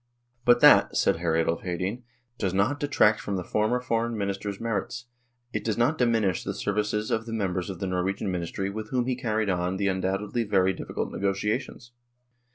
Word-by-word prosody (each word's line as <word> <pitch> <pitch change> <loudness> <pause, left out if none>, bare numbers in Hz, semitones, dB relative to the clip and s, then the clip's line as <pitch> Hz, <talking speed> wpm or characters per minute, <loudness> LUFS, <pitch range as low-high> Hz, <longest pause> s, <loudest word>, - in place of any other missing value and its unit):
" 120 0 -42
But 120 0 +5
that," - - +7
said 95 - +3
Hr. 85 -1 0
Adolf 80 0 +1
Hedin, 90 +6 -3 0.2
" 120 0 -46
does 95 -1 -1
not 125 +9 +1
detract 110 -7 +3
from 100 - -3
the 90 - -2
former 110 +6 +1
Foreign 115 -1 -1
Minister's 100 0 -3
merits, 115 +2 -3 0.5
it - - -2
does 110 -2 -1
not 125 +7 +2
diminish 115 -6 +2
the - - -4
services 105 +1 -1
of 110 +1 -1
the 115 - -5
members 95 -4 -2
of 95 - -5
the - - -2
Norwegian 95 +2 -1
ministry 90 +2 -3
with 110 +1 -6
whom 125 -2 0
he 130 0 0
carried 110 -4 0
on 90 +1 -1
the 100 0 +1
undoubtedly 95 +4 -1
very 95 -3 +2
difficult - - -4
negotiations. 105 +5 -2
105 Hz, 190 wpm, -27 LUFS, 95-115 Hz, 0.5 s, that